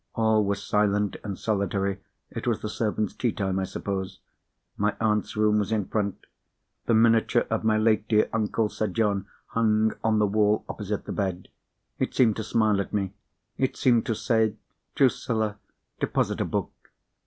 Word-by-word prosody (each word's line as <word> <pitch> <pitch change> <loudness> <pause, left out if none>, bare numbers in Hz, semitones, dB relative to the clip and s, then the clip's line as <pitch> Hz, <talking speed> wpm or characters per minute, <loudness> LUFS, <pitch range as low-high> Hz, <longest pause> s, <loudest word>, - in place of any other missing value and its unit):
All 110 -1 +3
was 100 0 -2
silent 105 -1 +1
and 100 -3 -4
solitary—it 100 -2 -3
was - - 0
the 105 - -2
servants' 110 -1 -1
tea 120 - 0
time, 95 -2 -1
I 95 - -1
suppose. 95 0 -4 0.6
My 105 +1 0
aunt's 105 -1 0
room 105 0 +3
was 105 +1 -2
in 105 -3 +1
front. 100 -3 -2 0.6
The 115 - +4
miniature 115 +1 +4
of 110 - 0
my 110 -1 +3
late 110 -1 +2
dear 110 -1 +3
uncle, 110 0 +1
Sir 110 +1 -2
John, 100 0 0 0.2
hung 110 -1 +2
on 110 -1 +2
the 105 - +4
wall 105 +1 +2
opposite 105 0 -4
the - - -5
bed. 95 -3 -3 0.5
It - - -1
seemed 115 -5 +4
to 110 - -2
smile 110 -2 +2
at - - -6
me; 100 -2 -1 0.5
it 130 - 0
seemed 120 -3 +3
to 115 - 0
say, 110 -1 +1 0.4
"Drusilla! 110 -5 +1 0.4
deposit - - 0
a - - +1
book." - - -2
105 Hz, 165 wpm, -26 LUFS, 100-110 Hz, 0.6 s, The